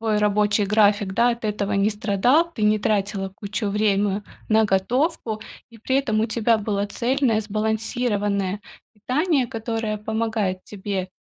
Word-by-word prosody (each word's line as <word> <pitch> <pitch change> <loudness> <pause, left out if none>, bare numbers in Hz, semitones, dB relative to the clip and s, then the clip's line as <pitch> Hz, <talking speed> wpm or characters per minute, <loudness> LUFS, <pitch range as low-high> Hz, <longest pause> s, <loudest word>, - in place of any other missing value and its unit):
твой 220 -2 +1
рабочий 210 0 +2
график, 205 -1 +3
да, 240 +3 +4
от 235 -1 -5
этого 210 -1 -1
не 200 +1 +2
страдал, 220 - +2
ты 220 - -5
не 210 0 +4
тратила 200 -1 -1
кучу 205 +2 -4
время 205 -1 +1 0.2
на 220 0 +4
готовку, 220 - 0 0.3
и 230 - -15
при 260 +4 0
этом 220 -6 +1
у 220 - +1
тебя 230 0 +2
было 205 -1 -1
цельное, 240 0 +1
сбалансированное 210 -2 -1 0.3
питание, 265 - 0
которое 225 -2 -3
помогает 220 -3 -2
тебе, 195 -2 -4
215 Hz, 145 wpm, -23 LUFS, 205-230 Hz, 0.3 s, да